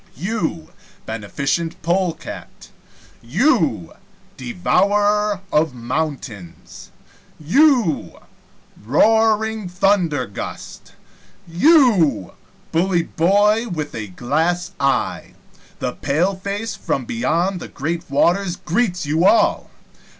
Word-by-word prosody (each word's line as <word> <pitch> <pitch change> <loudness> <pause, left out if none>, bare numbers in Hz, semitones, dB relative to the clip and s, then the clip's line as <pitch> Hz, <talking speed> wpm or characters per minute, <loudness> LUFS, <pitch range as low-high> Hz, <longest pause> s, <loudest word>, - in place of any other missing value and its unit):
You, 170 -5 -3 0.3
Beneficent 140 - -3
Polecat 175 -1 -3 0.5
you, 145 - +1 0.4
Devourer 205 +8 +1
of 150 -3 +2
Mountains 120 - -6 0.5
you, 240 - +2 0.7
Roaring 220 - +2
Thundergust 175 - -2 0.5
you, 180 - +3 0.4
Bully 175 +1 +1
Boy 205 +8 +2
with 155 -7 -5
a 110 -1 -5
Glass 160 - -1
eye 140 -1 -1 0.4
the - - -3
paleface 195 +8 -2
from 130 - -3
beyond 165 +12 -1
the - - -8
great 165 +4 -4
waters 175 +6 +1
greets 180 -1 -1
you 155 +4 +1
all! 335 - +3
175 Hz, 80 wpm, -20 LUFS, 145-205 Hz, 0.7 s, you